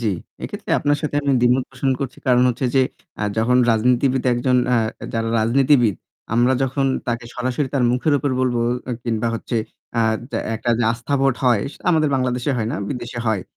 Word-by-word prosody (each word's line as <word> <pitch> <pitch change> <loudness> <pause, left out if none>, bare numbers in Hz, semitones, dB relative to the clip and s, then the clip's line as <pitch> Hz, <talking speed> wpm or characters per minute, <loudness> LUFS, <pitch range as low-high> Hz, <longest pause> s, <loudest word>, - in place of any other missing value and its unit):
জী। 110 -3 0 0.3
এক্ষেত্রে - - -6
আপনার 145 0 +1
সাথে 150 -1 -3
আমি 140 -1 +1
দ্বিমত 125 +1 +3
পোষণ 135 0 -1
করছি, 135 -3 -4
কারণ 125 -1 +4
হচ্ছে 125 +2 -2
যে, 135 - +5 0.4
আ - - -1 0.2
যখন 125 +3 +3
রাজনীতিবিদ 125 +3 +2
একজন 125 +1 +1 0.2
আ - - +4 0.4
যারা 115 0 -1
রাজনীতিবিদ, 125 -1 +3 0.4
আমরা 120 +2 +4
যখন 135 +1 0 0.2
তাকে 115 0 -2
সরাসরি 130 +3 -1
তার 130 -3 +2
মুখের 135 +4 +1
উপর 140 +1 -1
বলবো, 125 -2 +1 0.2
অ্যা 125 - -4
কিংবা 115 0 -1
হচ্ছে 115 +1 -3 0.4
আ - - +4 0.3
যা - - -2 0.2
একটা 120 +2 -2
যে 120 - +1
আস্থা 120 +5 -3
ভোট 135 -2 +3
হয়, 120 -5 +3
সেটা - - -18
আমাদের 155 -2 +3
বাংলাদেশে 125 0 0
হয় 110 -2 -1
না, - - -2
বিদেশে 120 -2 -5
হয়। 110 -4 +1
125 Hz, 190 wpm, -21 LUFS, 120-135 Hz, 0.4 s, যে